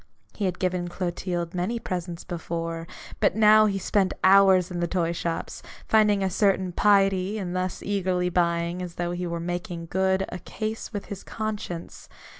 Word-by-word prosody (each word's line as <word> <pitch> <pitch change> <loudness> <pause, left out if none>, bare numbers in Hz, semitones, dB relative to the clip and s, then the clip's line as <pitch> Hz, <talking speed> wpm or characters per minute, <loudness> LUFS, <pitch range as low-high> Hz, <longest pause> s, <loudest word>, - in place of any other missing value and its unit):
He 205 - -2
had 180 -1 -1
given 180 -1 -1
Clotilde 175 -1 -3
many 185 +6 -1
presents 175 -5 -4
before; 165 -1 -4 0.3
but - - +2
now 215 0 +6
he 195 -2 0
spent 195 0 +1
hours 190 -1 +6
in 175 - -3
the 175 - 0
toy 170 -2 0
shops, 170 -1 -4 0.3
finding 210 -2 +4
a 190 - +1
certain 190 -2 +2
piety 195 +1 +3
in 185 -4 -4
thus 185 0 -2
eagerly 185 -3 0
buying, 170 0 0
as 175 -2 -6
though 175 0 -2
he 175 0 -3
were 170 0 -3
making 175 0 -4
good 190 0 +2
a 180 - -6
case 220 +5 -5
with 205 -3 -5
his 200 -2 -7
conscience. 210 -6 -5
185 Hz, 170 wpm, -26 LUFS, 175-195 Hz, 0.3 s, now